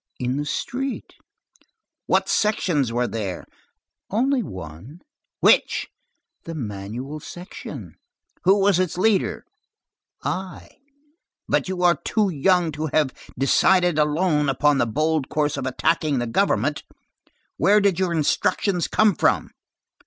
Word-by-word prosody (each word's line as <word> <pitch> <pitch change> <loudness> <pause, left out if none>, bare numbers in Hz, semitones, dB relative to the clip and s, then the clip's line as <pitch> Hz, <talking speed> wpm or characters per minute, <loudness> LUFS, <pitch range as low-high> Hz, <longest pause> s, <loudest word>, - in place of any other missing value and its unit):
"In 125 +2 -1
the 145 - -2
street." 265 - -4 0.9
"What - - +2
sections 170 - +1
were 120 +1 0
there?" 100 -6 -4 0.6
"Only 255 +5 +1
one." 95 - -9 0.4
"Which?" - - +3 0.6
"The 165 - -6
Manuel 115 +4 -6
section." 175 +5 -9 0.5
"Who 190 +3 +5
was 195 -2 +3
its 185 -2 -1
leader?" 200 +1 +1 0.8
"I." 185 0 -4 1.0
"You 185 -1 -3
are 175 -1 +4
too 215 -3 +1
young 175 +1 +2
to 155 +2 -3
have 150 -2 +1 0.2
decided 175 +5 +3
alone 150 -1 +2
upon 140 +1 +2
the - - +2
bold 155 +4 0
course 150 -1 0
of 135 -2 -3
attacking 150 +2 0
the 120 - -1
government. 140 - 0 0.8
Where 205 +2 +4
did 200 -3 +1
your 185 -2 +1
instructions 170 +3 +1
come 215 -2 +3
from?" - - +1
155 Hz, 120 wpm, -23 LUFS, 135-185 Hz, 1.0 s, Who